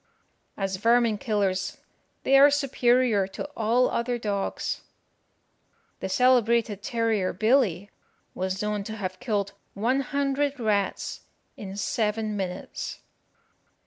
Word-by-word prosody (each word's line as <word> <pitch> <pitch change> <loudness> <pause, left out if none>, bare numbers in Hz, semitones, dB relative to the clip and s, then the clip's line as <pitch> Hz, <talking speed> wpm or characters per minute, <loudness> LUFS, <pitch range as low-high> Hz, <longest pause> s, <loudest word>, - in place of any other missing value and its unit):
As 195 -1 -2
vermin 230 0 +3
killers, 195 -5 -1 0.5
they 270 - +4
are 280 +1 +8
superior 250 -7 +2
to 195 - -6
all 230 +3 +3
other 240 +1 -1
dogs. 205 -4 -2 1.2
The - - -4
celebrated 235 -2 +3
terrier 225 -5 0
Billy 210 -3 +2 0.4
was 190 +2 -2
known 210 -1 -1
to 220 - -5
have 185 -3 -5
killed 205 -5 -1 0.2
one 240 +7 +1
hundred 280 +1 -1
rats 210 -3 -1 0.3
in 195 -1 -8
seven 215 0 -1
minutes. 185 -2 -5
220 Hz, 110 wpm, -26 LUFS, 200-245 Hz, 1.2 s, are